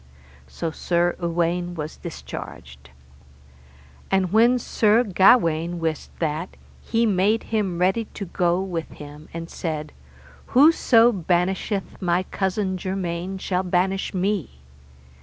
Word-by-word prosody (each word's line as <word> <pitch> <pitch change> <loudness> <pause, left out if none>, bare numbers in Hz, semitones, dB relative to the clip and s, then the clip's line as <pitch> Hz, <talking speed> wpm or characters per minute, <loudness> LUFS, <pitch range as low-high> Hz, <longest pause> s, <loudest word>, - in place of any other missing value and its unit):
So 160 - -4
Sir 175 +2 0
Uwaine 175 +1 -1
was 155 -1 -5
discharged. 65 - -9 1.2
And 190 -1 +1
when 235 +3 +5
Sir 225 -1 +2
Gawaine 175 -5 +3
wist 160 -2 -3
that, 160 +2 -3 0.3
he 230 0 +1
made 205 +2 +2
him 195 -5 0
ready 190 +6 +1
to 200 - -5
go 175 0 0
with 170 -4 -4
him; 150 +1 -11
and 165 0 -6
said, 155 -3 -4 0.7
Whoso 255 -5 +6
banisheth 190 +1 -1
my 180 0 +1
cousin 190 0 -2
germain 185 0 -3
shall 185 -1 -1
banish 190 +1 0
me. 190 - -1
180 Hz, 115 wpm, -23 LUFS, 170-195 Hz, 1.2 s, Whoso